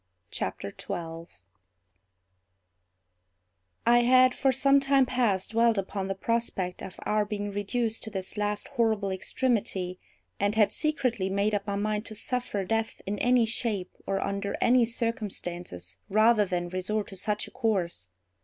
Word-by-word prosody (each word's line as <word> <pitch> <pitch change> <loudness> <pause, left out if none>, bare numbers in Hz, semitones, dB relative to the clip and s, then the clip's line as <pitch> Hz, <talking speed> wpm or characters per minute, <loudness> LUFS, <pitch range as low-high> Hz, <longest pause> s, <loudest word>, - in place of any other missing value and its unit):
CHAPTER - - -4
12 165 - -7 2.4
I 240 +1 +6
had 255 +1 +5
for 270 - +2
some 275 +2 +4
time 275 -1 +4
past, 235 -7 0
dwelt 230 0 +3
upon 195 0 -2
the 195 - -2
prospect 195 -4 -1
of 190 - -8
our 210 0 +2
being 205 0 -4
reduced 220 +3 -1
to - - -4
this 190 -3 -5
last 210 0 -2
horrible 220 -6 +1
extremity, 190 -3 -1 0.4
and 205 +1 +1
had 215 -2 +4
secretly 250 -10 0
made 200 +2 +1
up 205 0 -1
my 200 - -1
mind 210 +1 -1
to 220 - -7
suffer 230 -3 -2
death 225 +3 -2
in 200 +1 -3
any 245 -1 +4
shape 220 -4 -2
or 195 0 0
under 200 +1 -2
any 245 0 +5
circumstances 185 - -4
rather 215 +1 +5
than 175 -2 -2
resort 200 +4 -1
to 195 - -9
such 210 +2 -2
a - - -13
course. 180 - -1
210 Hz, 145 wpm, -28 LUFS, 195-235 Hz, 2.4 s, I